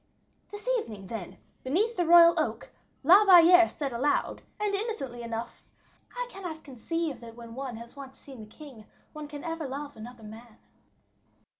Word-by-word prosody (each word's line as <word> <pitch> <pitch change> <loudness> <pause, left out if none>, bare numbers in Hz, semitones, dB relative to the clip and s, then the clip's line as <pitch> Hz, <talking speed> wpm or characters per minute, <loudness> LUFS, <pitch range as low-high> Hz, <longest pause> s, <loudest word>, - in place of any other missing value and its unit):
"This 415 +3 -10
evening, 210 - -9
then, 190 -3 -7 0.3
beneath 405 - 0
the 350 -2 0
royal 340 0 +8
oak, - - -3 0.3
La 370 +8 +7
Valliere 355 -2 +7
said 275 -4 -5
aloud, 280 +5 -1 0.2
and 420 -1 -1
innocently 395 - -4
enough, 230 0 -6 0.5
'I - - -2
cannot 350 -6 -8
conceive 285 +1 -4
that 230 -1 -11
when 230 -1 -11
one 260 -2 -6
has 235 +2 -12
once 270 -1 -11
seen 270 -4 -13
the 215 - -10
king, 245 -3 -13 0.3
one 305 -1 -8
can 290 -1 -9
ever 325 -3 -4
love 285 +2 -7
another 230 +1 -11
man. 220 +1 -12
280 Hz, 160 wpm, -28 LUFS, 235-340 Hz, 0.5 s, royal